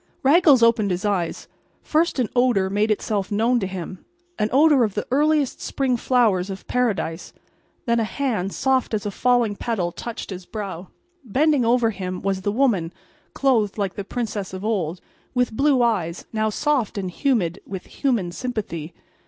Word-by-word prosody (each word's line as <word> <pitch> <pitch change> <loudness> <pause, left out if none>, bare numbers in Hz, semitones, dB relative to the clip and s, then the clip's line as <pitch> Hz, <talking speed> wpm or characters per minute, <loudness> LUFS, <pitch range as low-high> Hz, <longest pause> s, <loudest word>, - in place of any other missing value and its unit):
Raggles 285 -3 +6
opened 230 -3 +4
his 185 +3 -2
eyes. 190 -5 -1 0.4
First 320 +1 +1
an 250 -4 +1
odor 240 -7 +2
made 210 +2 +1
itself 210 -2 -1
known 230 +4 +2
to 190 - -2
him—an 215 - -6
odor 285 -1 +5
of 210 -4 -1
the 210 - -2
earliest 295 0 +2
spring 265 -2 0
flowers 225 -7 +2
of 195 0 -7
Paradise. 205 -9 -1
And - - -33 0.4
then 235 -2 +2
a - - +2
hand 215 -4 -2
soft 260 -2 +1
as 210 0 -3
a 205 - -2
falling 240 -1 +2
petal 200 -6 -2
touched 230 +3 -7
his 180 -1 -8
brow. 195 -5 -6 0.4
Bending 275 +4 +2
over 235 -1 +3
him 185 -2 -5
was 195 -1 -1
the 205 - -1
woman 210 -9 +1 0.4
clothed 230 -8 +2
like 200 -3 -1
the 200 - -5
princess 205 -3 -4
of 185 +2 -6
old, 185 -6 -1 0.3
with 245 -2 +1
blue 275 -1 +3
eyes, 185 -8 -1
now 220 0 +1
soft 260 -2 0
and 185 -2 -3
humid 195 - 0
with 190 -1 -6
human 230 -11 -1
sympathy. 175 -8 -5
220 Hz, 170 wpm, -23 LUFS, 190-250 Hz, 0.4 s, Raggles